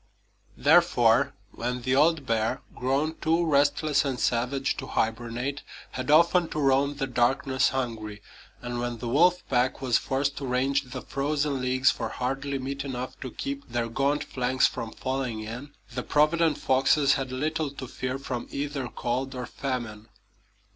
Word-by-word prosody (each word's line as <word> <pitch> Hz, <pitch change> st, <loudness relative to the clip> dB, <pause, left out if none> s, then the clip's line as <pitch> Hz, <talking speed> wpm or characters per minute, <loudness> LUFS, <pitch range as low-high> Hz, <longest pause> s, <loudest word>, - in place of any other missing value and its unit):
Therefore, 140 Hz, -, +4 dB, 0.2 s
when 125 Hz, +1 st, -3 dB
the 130 Hz, +2 st, +1 dB
old 155 Hz, 0 st, +3 dB
bear, 115 Hz, -2 st, 0 dB
grown 140 Hz, +5 st, 0 dB
too 165 Hz, +1 st, +1 dB
restless 145 Hz, 0 st, +3 dB
and 135 Hz, -3 st, -2 dB
savage 125 Hz, +3 st, 0 dB
to -, -, -5 dB
hibernate, 120 Hz, +5 st, -2 dB, 0.3 s
had 130 Hz, +1 st, -5 dB
often 170 Hz, +2 st, +5 dB
to 155 Hz, -, -3 dB
roam 140 Hz, 0 st, +2 dB
the 140 Hz, -1 st, -1 dB
darkness 130 Hz, +2 st, +2 dB
hungry, 115 Hz, -5 st, -4 dB, 0.4 s
and 120 Hz, 0 st, -3 dB
when 120 Hz, -1 st, -3 dB
the 120 Hz, -, -5 dB
wolf 175 Hz, +8 st, +3 dB
pack 125 Hz, 0 st, +1 dB
was 130 Hz, -3 st, +2 dB
forced 140 Hz, +1 st, -1 dB
to 140 Hz, -, -4 dB
range 135 Hz, +3 st, +1 dB
the 125 Hz, 0 st, -7 dB
frozen 145 Hz, -1 st, -1 dB
leagues 130 Hz, +1 st, +3 dB
for 115 Hz, -2 st, -4 dB
hardly 135 Hz, +2 st, -2 dB
meat 135 Hz, +1 st, -4 dB
enough 130 Hz, -2 st, -5 dB
to 130 Hz, -, -5 dB
keep 140 Hz, +3 st, -5 dB
their 120 Hz, -1 st, -1 dB
gaunt 140 Hz, +5 st, +1 dB
flanks 130 Hz, 0 st, +1 dB
from 115 Hz, -, -2 dB
falling 130 Hz, -4 st, -3 dB
in, 120 Hz, +7 st, -7 dB, 0.2 s
the -, -, -2 dB
provident 155 Hz, +1 st, +2 dB
foxes 135 Hz, +2 st, +3 dB
had 135 Hz, -1 st, -2 dB
little 155 Hz, +3 st, -1 dB
to 135 Hz, -1 st, -8 dB
fear 130 Hz, +1 st, -3 dB
from 130 Hz, -3 st, -5 dB
either 140 Hz, -2 st, -3 dB
cold 130 Hz, +3 st, -3 dB
or 125 Hz, -1 st, -4 dB
famine. 120 Hz, -6 st, -4 dB
135 Hz, 160 wpm, -27 LUFS, 125-140 Hz, 0.4 s, often